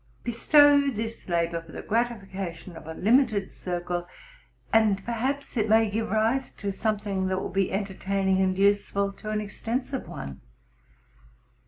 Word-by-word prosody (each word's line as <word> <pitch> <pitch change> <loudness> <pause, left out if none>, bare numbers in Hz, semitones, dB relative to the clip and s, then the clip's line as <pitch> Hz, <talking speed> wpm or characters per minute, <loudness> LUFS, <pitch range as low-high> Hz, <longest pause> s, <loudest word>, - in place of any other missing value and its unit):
Bestow 285 +4 +5
this 225 -4 -5
labor 170 -1 0
for 165 -1 -15
the - - -7
gratifi 230 -3 -1
cation 185 -2 -6
of 160 - -11
a 160 - -6
limited 220 -2 +2
circle, 175 -1 -3 0.7
and 215 -3 +3
perhaps 260 +4 -2
it 215 -1 +1
may 220 -1 +4
give 220 +2 -1
rise 225 +5 +1
to 200 0 -4
something 200 -2 -1
that 185 0 0
will - - -4
be 195 -1 +1
entertaining 195 -1 0
and 185 -1 +1
useful 200 0 +2
to 215 - -8
an 215 - 0
exten 225 +5 -3
sive 265 -2 -5
one. 70 -1 -7
205 Hz, 155 wpm, -27 LUFS, 190-230 Hz, 0.7 s, Bestow